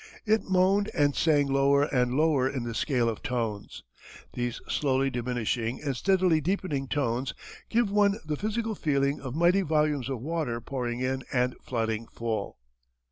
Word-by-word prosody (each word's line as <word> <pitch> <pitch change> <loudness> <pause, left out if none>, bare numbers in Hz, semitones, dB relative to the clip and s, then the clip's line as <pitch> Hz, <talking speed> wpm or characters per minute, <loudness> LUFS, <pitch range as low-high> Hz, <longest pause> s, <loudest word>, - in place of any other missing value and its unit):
It 220 0 +2
moaned 190 +2 +3
and 145 -3 +2
sang 150 -3 +3
lower 140 +1 +3
and 125 -4 +1
lower 145 -4 +3
in 130 -3 -3
the 120 -1 -4
scale 125 -1 +1
of 115 - -2
tones. 115 -7 -3 0.5
These 120 0 -3
slowly 135 -1 +1
diminishing 120 -1 -2
and 140 -3 -1
steadily 185 0 +2
deepening 155 -5 -1
tones 130 -1 -1 0.3
give 230 -3 +2
one 205 0 +3
the 150 0 -1
physical 220 +5 -2
feeling 140 -5 0
of 130 -1 -6
mighty 175 +4 +4
volumes 150 -5 +1
of 130 -3 -3
water 150 -3 -2
pouring 120 -1 -4
in 130 +1 -1
and 125 -1 +1
flooding 115 -2 -2
full. 115 -2 -4
140 Hz, 155 wpm, -28 LUFS, 125-160 Hz, 0.5 s, mighty